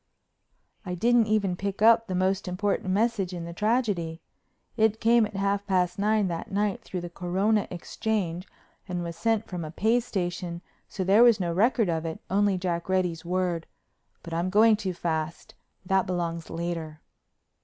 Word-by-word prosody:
I 180 -3 -4
didn't 235 +4 +3
even 205 -4 +1
pick 200 +1 -4
up 230 0 +6
the 185 - -3
most 190 +2 0
important 190 +1 -1
message 200 -2 +1
in 170 -1 -5
the 170 - -7
tragedy. 205 -6 0 0.6
It 220 -1 +2
came 230 -1 +4
at 210 - -14
half 200 +1 -1
past 180 -2 +1
nine 210 0 +2
that 170 +4 -5
night 205 0 0
through 180 - -5
the 175 - -6
Corona 195 +5 0
Exchange 180 -1 -3 0.4
and 180 -2 -3
was 170 -1 -5
sent 225 +2 0
from 180 -2 -5
a 155 - -5
pay 220 +9 +2
station 175 -6 -4 0.3
so 190 - -3
there 195 +5 +5
was 235 -3 +6
no 170 -2 -1
record 225 +3 +3
of 165 -2 -1
it, 160 -1 -5
only 200 0 +2
Jack 175 -1 -3
Reddy's 180 -3 0
word—but 175 -1 -5
I'm 170 +2 0
going 215 +3 +5
too 200 -3 -3
fast; 160 -2 -3 0.3
that 190 +1 +2
belongs 170 -2 -3
later. 165 -2 -4
185 Hz, 165 wpm, -27 LUFS, 175-210 Hz, 0.6 s, up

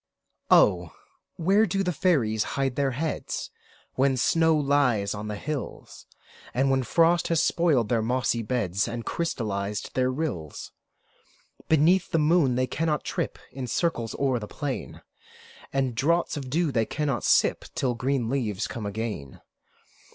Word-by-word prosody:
Oh! 90 -4 +4 0.4
where 195 +6 +3
do 195 +2 0
fairies 150 - +1
hide 135 -2 0
their 140 -1 +1
heads, 145 +5 -3 0.4
When 135 0 +2
snow 160 +4 +3
lies 135 -8 +2
on 105 0 -6
the 105 - -3
hills, 145 +6 -6 0.5
When 135 +1 +2
frost 165 +6 +3
has 165 -1 +2
spoiled 150 - +2
their 115 -2 +2
mossy 120 0 0
beds, 105 -5 -1
And 115 0 -5
crystallized 105 -10 -3
their 130 0 +1
rills? 130 - -4 1.0
Beneath 165 +4 +4
the - - +1
moon 150 -4 +3
they 130 +1 +1
cannot 150 +3 -1
trip - - -3
In 130 -1 -5
circles 120 -5 -1
o'er 130 -3 +1
the 105 - -7
plain; 145 +1 -5 0.7
And 135 -2 0
draughts 165 +8 +1
of 135 -3 -5
dew 160 +2 +1
they 115 -4 +1
cannot 145 -5 -2
sip, - - +3
Till 125 -2 0
green 125 0 -1
leaves 115 -6 -1
come 110 -3 -5
again. 100 - -5
130 Hz, 140 wpm, -26 LUFS, 115-155 Hz, 1.0 s, Oh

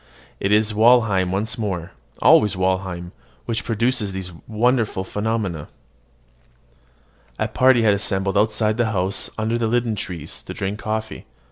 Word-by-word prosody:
It 95 - -1
is 105 +1 +3
Walheim 110 -5 +4
once 110 +5 -1
more 95 -6 -3 0.3
always 105 -2 +5
Walheim 95 -2 -1 0.3
which 115 0 -2
produces 115 -2 0
these 95 -1 -5 0.2
wonderful 110 -3 +1
phenomena. 105 -6 -3 1.7
A - - 0
party 130 -2 +4
had 105 -2 +5
assembled 95 -1 -1
outside 110 +1 +1
the 115 -3 0
house 95 +1 0
under 110 +2 -1
the 115 - 0
linden 120 -1 0
trees, 85 -6 -6
to - - -9
drink 100 +2 -3
coffee. 110 0 -4
105 Hz, 135 wpm, -21 LUFS, 95-115 Hz, 1.7 s, always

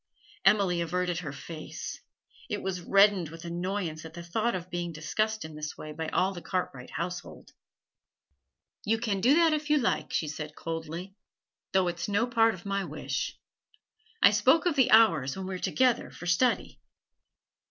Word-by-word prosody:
Emily 195 -3 +4
averted 175 0 -1
her 155 -5 -5
face; 155 +3 -7 0.5
it - - -3
was 185 -2 -2
reddened 195 -2 +4
with 165 +1 -10
annoyance 175 -2 -3
at 160 0 -10
the 170 - -7
thought 220 +7 0
of 185 0 -6
being 175 0 -3
discussed 215 +7 -1
in 160 - -9
this 150 0 -6
way 155 - -7
by 160 +1 -4
all 190 +4 +1
the 175 - -8
Cartwright 155 -10 -3
household. 180 +1 -6 1.3
'You 225 0 +2
can 210 -4 -1
do 260 +8 +5
that 330 -1 +5
if 300 0 -2
you 300 - +5
like,' 245 -4 0
she 155 - 0
said 150 0 -6
coldly, 165 +3 -5 0.6
'though 190 -1 +3
it's 175 +2 -3
no 205 +3 +2
part 225 -3 +3
of 175 - -14
my 200 0 -1
wish. - - -4 0.9
I - - +9
spoke 255 - +4
of 345 -4 +2
the 265 -4 +4
hours 165 - +5
when 190 - -4
we 190 - -4
are 185 - -4
together 250 +2 +2
for 175 - -10
study.' 175 +9 +1
180 Hz, 175 wpm, -29 LUFS, 165-215 Hz, 1.3 s, I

